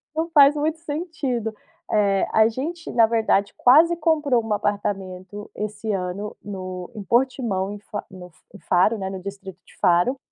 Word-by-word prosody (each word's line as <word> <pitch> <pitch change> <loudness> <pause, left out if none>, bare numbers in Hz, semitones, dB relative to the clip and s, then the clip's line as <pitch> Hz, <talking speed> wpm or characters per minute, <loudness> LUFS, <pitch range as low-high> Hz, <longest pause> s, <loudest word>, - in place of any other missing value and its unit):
não 320 +1 -1
faz 290 -2 +7
muito 310 +2 -1
sentido. 290 -8 -3 0.4
Eh, 200 -2 +2
a 220 0 +5
gente 315 +9 -5
na 230 -2 +5
verdade 220 -3 +1
quase 320 +7 +5
comprou 300 -7 +2
um 225 - -3
apartamento 205 -1 -3
esse 210 +1 -4
ano 190 +2 -4
no 185 -3 -7
em 210 - -6
Portimão, 235 -5 0
em 205 - -6
Fa 205 0 -6
no 180 -1 -11 0.2
em - - -10
Faro, 185 +5 +2
né, 190 -1 -4
no 190 -1 -6
distrito 195 -1 -8
de - - -21
Faro. 180 +8 +3
210 Hz, 165 wpm, -23 LUFS, 195-275 Hz, 0.4 s, faz